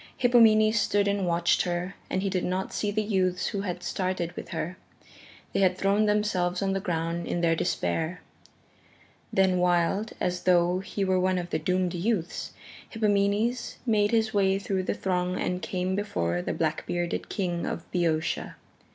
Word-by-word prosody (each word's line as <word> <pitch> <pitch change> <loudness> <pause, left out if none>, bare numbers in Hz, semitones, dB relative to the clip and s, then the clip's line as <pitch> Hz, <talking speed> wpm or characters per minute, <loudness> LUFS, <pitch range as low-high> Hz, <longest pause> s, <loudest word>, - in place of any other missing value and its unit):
Hippomenes 225 -3 +5
stood 205 0 +2
and 200 -2 0
watched 170 0 +2
her 175 +1 -2 0.2
and 190 - -1
he 195 - 0
did 185 -2 0
not 185 +1 -2
see 205 - -1
the 215 +1 0
youths 185 -4 0
who 200 - -3
had 180 -2 -4
started 185 -2 -2
with - - -8
her 170 +2 -3 0.8
they - - +1
had 185 -1 +3
thrown 200 +3 +2
themselves 195 -3 +1
on 195 0 +1
the 195 - 0
ground 170 -2 -2
in 175 - -1
their 165 -1 +3
despair. 160 - -1 1.1
Then 190 -1 +3
wild, 180 +4 +1
as 180 0 -1
though 180 0 +3
he 195 +1 -3
were 185 -1 +2
one 185 0 +1
of 175 -1 -4
the 155 - 0
doomed 180 +2 0
youths, 180 -1 -2 0.4
Hippomenes 215 +2 +1
made 210 -3 +3
his 220 -1 +1
way 195 -1 +3
through 195 -1 -1
the - - -1
throng 180 -1 -1
and 180 0 -1
came 180 +3 -2
before 90 - -1
the - - -3
black 155 -1 -1
bearded 175 -1 -2
King 175 -4 -2
of 170 - -4
Boeotia. 165 -3 -1
185 Hz, 170 wpm, -27 LUFS, 175-200 Hz, 1.1 s, Hippomenes